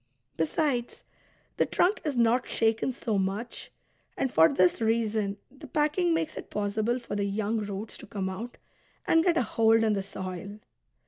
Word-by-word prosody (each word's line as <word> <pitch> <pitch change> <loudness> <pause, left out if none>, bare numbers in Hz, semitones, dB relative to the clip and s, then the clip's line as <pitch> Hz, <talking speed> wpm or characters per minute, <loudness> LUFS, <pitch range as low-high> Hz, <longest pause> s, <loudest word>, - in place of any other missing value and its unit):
Besides, 245 - -1 0.5
the - - +2
trunk 380 +4 +2
is 295 -5 -2
not 235 +1 +3
shaken 225 +3 +1
so 225 -5 -1
much, 195 +5 -3 0.5
and 265 - 0
for 160 +1 +7
this 185 +4 +3
reason 220 -3 0
the 280 +3 -12
packing 305 +6 +1
makes 325 -1 -1
it - - -7
possible 215 +3 0
for 240 -4 -6
the 200 -1 0
young 210 +2 -1
roots 205 +1 -5
to - - -11
come 195 -2 -3
out 220 +6 -6 0.5
and 325 0 +4
get 340 -2 +3
a - - +3
hold 225 0 +3
in 220 -1 +3
the 200 - 0
soil. 190 +1 -6
225 Hz, 170 wpm, -28 LUFS, 200-255 Hz, 0.5 s, for